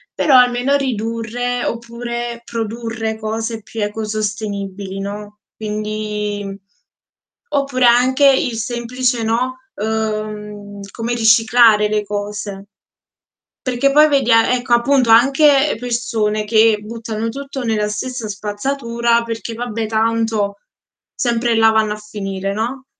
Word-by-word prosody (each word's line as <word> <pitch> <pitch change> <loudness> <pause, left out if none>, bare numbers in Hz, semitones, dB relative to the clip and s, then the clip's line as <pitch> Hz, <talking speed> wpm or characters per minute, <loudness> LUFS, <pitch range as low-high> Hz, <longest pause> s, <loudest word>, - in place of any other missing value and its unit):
Però 275 -4 +3
almeno 250 +2 +4
ridurre, 240 -1 -2
oppure 235 0 -4
produrre 225 -1 -4
cose 225 +1 -3
più 215 +1 -5
ecosostenibili, 205 -2 -4
no, 205 +1 -6 0.2
quindi 210 -1 -4 0.9
oppure 275 -3 +1
anche 255 +4 +4
il 250 -3 +1
semplice, 240 +1 -1
no, 250 +3 -1 0.2
uhm 215 -1 -3 0.3
come 235 +1 -3
riciclare 225 -1 +5
le 210 0 0
cose 205 -1 -5 1.0
perché 255 +2 +2
poi 300 +2 +6
vedi 275 -5 +2
a 225 +2 +5
ecco, 245 -1 0
appunto, 245 0 +2
anche 275 +4 +5
persone 230 -3 -1
che 220 0 +4
buttano 225 0 -5
tutto 270 +1 -5
nella 210 -2 0
stessa 225 +1 -4
spazzatura 235 +3 -1
perché: 230 0 -5
"Vabbè, 230 -2 -3
tanto 220 -2 0 0.5
sempre 235 -1 0
là 225 0 +6
vanno 220 -1 +2
a - - -7
finire", 195 -2 -4
no? 245 +5 -3
225 Hz, 110 wpm, -18 LUFS, 210-245 Hz, 1.0 s, poi